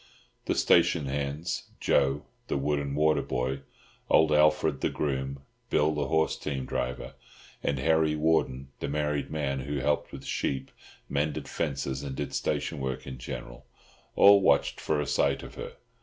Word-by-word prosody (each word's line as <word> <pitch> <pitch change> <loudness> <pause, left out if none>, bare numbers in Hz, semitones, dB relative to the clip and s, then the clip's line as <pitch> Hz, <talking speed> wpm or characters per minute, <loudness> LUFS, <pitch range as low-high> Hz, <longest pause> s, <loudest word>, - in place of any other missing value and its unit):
The - - 0
station 85 -3 +4
hands—Joe, 70 0 -1 0.2
the - - 0
wood 75 +1 0
and 70 -1 -3
water 75 -1 +3
boy, 65 +1 -2 0.5
old 80 -1 +5
Alfred 75 -1 +3
the - - +2
groom, 70 -1 -3 0.3
Bill 75 +1 +3
the 75 -1 -1
horse 80 0 +2
team 70 -3 -3
driver, 65 0 -3 0.5
and 70 - 0
Harry 80 +2 +2
Warden 75 -4 +1
the - - -3
married 75 0 -1
man, 70 -3 -1
who 70 +3 -3
helped 75 +2 0
with - - -9
sheep, 65 -1 -2 0.4
mended 70 +1 -1
fences, 70 -3 -2
and 70 -2 -5
did - - -4
station - - -1
work 65 -1 -3
in 65 -2 -7
general—all 65 +11 +1
watched 70 -6 +2
for 75 - 0
a 75 - 0
sight 70 +1 +1
of - - -9
her. - - -7
70 Hz, 155 wpm, -28 LUFS, 65-75 Hz, 0.5 s, old